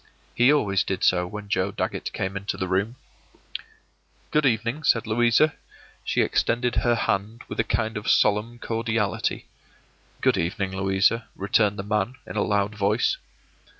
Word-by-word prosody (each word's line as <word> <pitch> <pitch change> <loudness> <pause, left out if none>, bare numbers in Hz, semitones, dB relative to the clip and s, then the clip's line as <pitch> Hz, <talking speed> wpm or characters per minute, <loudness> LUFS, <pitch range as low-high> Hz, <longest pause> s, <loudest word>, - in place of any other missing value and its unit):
He 125 +3 +5
always 100 -10 +2
did 95 - -3
so 90 -1 +3
when 105 +2 -8
Joe 95 0 0
Dagget - - -3
came 95 +1 -3
into 100 +1 -3
the 95 - -2
room. 100 +6 0 1.4
“Good 150 -2 +3
evening,” 115 +4 0
said 120 -7 +3
Louisa. 120 +7 +3 0.5
She - - +1
extended 120 +1 0
her 120 -1 +3
hand 110 +2 -2
with - - -7
a - - +4
kind 110 0 -1
of 105 - -3
solemn 105 +3 +2
cordiality. 115 -3 -2 0.7
“Good - - +2
evening, 95 +2 -2
Louisa,” 95 +4 +1
returned 100 +1 +1
the 95 - -4
man, 105 +3 -1
in - - -8
a 105 - +1
loud 105 0 0
voice. 105 +2 +1
105 Hz, 150 wpm, -25 LUFS, 100-115 Hz, 1.4 s, He